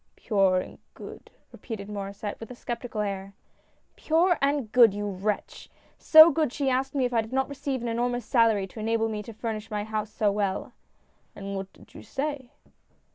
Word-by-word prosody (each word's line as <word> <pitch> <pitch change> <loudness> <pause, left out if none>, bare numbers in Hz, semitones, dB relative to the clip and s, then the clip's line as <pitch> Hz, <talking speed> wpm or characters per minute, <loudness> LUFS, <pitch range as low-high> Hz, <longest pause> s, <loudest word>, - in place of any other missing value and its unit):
"Pure 195 -4 +2
and - - -11 0.2
good," - - -11 0.2
repeated 215 -5 -7
Maurcsset, 205 0 -6
with 225 - -9
a 250 - -9
skepti 240 0 -6
cal 215 - -2
air. 195 -1 -5 0.3
" - - -41
Pure 340 +3 +2
and 275 -5 0
good, 230 -4 +6
you 205 0 -3
wretch! 200 +1 -4 0.3
so 315 +1 +9
good 315 -3 +1
that - - -16
she 275 -2 0
asked 265 +2 -1
me 265 -2 +2
if 245 - -2
I 230 - +3
did 220 +1 -10
not 265 0 0
receive 275 -3 -4
an - - -2
enormous 245 0 -1
salary 225 -5 +3
to 195 +4 -11
enable 225 +1 0
me 215 -1 -4
to 220 - -9
furnish 220 -1 -5
my 210 -2 -2
house 215 0 -3
so 210 -2 +1
well." 200 -2 -2 0.3
" - - -40
And 200 0 -6
what 195 0 -5
did - - -20
you - - -10
say 280 -2 -4
225 Hz, 205 wpm, -26 LUFS, 205-260 Hz, 0.3 s, so